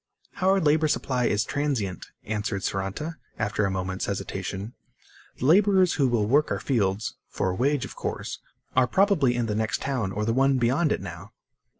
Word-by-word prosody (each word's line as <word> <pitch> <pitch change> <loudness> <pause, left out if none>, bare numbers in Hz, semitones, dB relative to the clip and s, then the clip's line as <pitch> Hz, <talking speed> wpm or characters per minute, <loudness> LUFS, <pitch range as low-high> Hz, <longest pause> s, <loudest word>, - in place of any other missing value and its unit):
"Our 190 +1 +4
labor 155 -1 +3
supply 130 -4 0
is 105 0 +1
transient," 130 - -2 0.2
answered 105 -2 -3
Saranta 100 +13 -3 0.2
after 105 -1 0
a - - +1
moment's 95 0 -3
hesitation. 100 +2 -4 0.6
"The - - -3
laborers 190 +2 +5
who 140 -3 +2
will 120 -4 +1
work 145 +8 +3
our - - -1
fields 105 -5 -1
for 95 - -1
a - - -3
wage, 135 +4 +1
of - - -10
course - - -4 0.4
are 130 -1 +4
probably 170 - +3
in 120 -1 0
the 105 - -2
next 110 0 -1
town 125 -9 -1
or 105 +2 -2
the 115 - +1
one 135 +1 +3
beyond 130 +6 +2
it - - 0
now." 95 +3 -9
120 Hz, 180 wpm, -26 LUFS, 100-145 Hz, 0.6 s, laborers